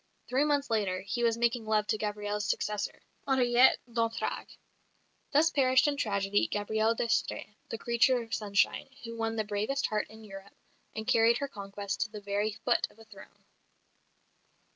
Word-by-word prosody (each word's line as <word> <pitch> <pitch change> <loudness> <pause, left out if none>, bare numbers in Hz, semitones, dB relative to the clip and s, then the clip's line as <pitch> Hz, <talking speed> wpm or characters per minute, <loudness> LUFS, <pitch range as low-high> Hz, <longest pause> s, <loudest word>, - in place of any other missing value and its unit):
Three 260 +3 +2
months 285 -3 0
later 195 -4 0
he 205 +5 -3
was 230 -1 +2
making 235 -1 0
love 215 -1 +2
to 215 +1 0
Gabrielle's 210 0 -2
successor, 210 -1 -2 0.2
Henriette 250 -1 +5
d'Entragues! 230 -1 -3 0.7
Thus 305 +3 +4
perished 260 0 +4
in 290 - +1
tragedy 205 -5 +1
Gabrielle 220 +2 0
d'Estrées, 225 -2 -1 0.2
the 225 - -4
creature 240 +2 +3
of 225 - -10
sunshine, 205 +4 +1
who 230 0 -6
won 225 0 -2
the 220 - 0
bravest 215 +7 -1
heart 215 0 -1
in 220 0 -13
Europe, 195 -1 -11 0.4
and 220 0 -4
carried 235 -1 +4
her 280 - -3
conquest 200 -4 -5
to 225 - 0
the 210 -1 -8
very 205 +1 -1
foot - - +2
of - - -23
a 225 - -14
throne. - - -15
220 Hz, 165 wpm, -30 LUFS, 205-240 Hz, 0.7 s, Henriette